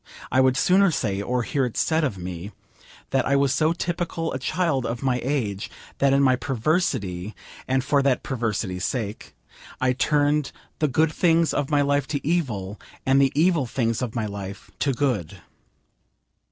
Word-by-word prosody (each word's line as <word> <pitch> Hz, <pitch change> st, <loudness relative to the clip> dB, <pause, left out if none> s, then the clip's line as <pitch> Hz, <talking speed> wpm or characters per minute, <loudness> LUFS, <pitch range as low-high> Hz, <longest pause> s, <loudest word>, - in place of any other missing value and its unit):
I 130 Hz, -, +4 dB
would 130 Hz, 0 st, +3 dB
sooner 190 Hz, +6 st, +4 dB
say, 100 Hz, -, -1 dB
or 125 Hz, +3 st, -1 dB
hear 140 Hz, +2 st, 0 dB
it 125 Hz, -3 st, -3 dB
said 160 Hz, 0 st, +2 dB
of 120 Hz, -10 st, -1 dB
me, 90 Hz, +2 st, -6 dB, 0.6 s
that 135 Hz, -2 st, +1 dB
I 140 Hz, -, +3 dB
was 140 Hz, -1 st, +3 dB
so 155 Hz, +3 st, +2 dB
typical 170 Hz, -1 st, -2 dB
a 130 Hz, -, -3 dB
child 160 Hz, -2 st, 0 dB
of 115 Hz, +1 st, -4 dB
my 125 Hz, -2 st, +1 dB
age, 115 Hz, -7 st, -2 dB, 0.3 s
that 140 Hz, -1 st, +4 dB
in 140 Hz, +1 st, +4 dB
my 130 Hz, -1 st, +5 dB
perversity, 120 Hz, -, -1 dB, 0.3 s
and 130 Hz, 0 st, +1 dB
for 140 Hz, +1 st, +2 dB
that 135 Hz, -2 st, +1 dB
perversity's 110 Hz, -7 st, -2 dB
sake, 105 Hz, -, -4 dB, 0.4 s
I 130 Hz, -1 st, +2 dB
turned 145 Hz, +1 st, +1 dB, 0.3 s
the 155 Hz, -, +2 dB
good 155 Hz, +4 st, +2 dB
things 165 Hz, -1 st, +3 dB
of 145 Hz, -2 st, -1 dB
my 145 Hz, -1 st, +3 dB
life 145 Hz, -1 st, +1 dB
to 145 Hz, -2 st, -3 dB
evil, 110 Hz, -, -1 dB, 0.2 s
and 135 Hz, +1 st, +4 dB
the 135 Hz, -1 st, +3 dB
evil 160 Hz, -3 st, +3 dB
things 115 Hz, -1 st, -1 dB
of 125 Hz, -2 st, -3 dB
my 115 Hz, -2 st, -1 dB
life 100 Hz, -1 st, -7 dB
to 140 Hz, -, +1 dB
good. 120 Hz, -, -1 dB
130 Hz, 175 wpm, -24 LUFS, 115-150 Hz, 0.6 s, my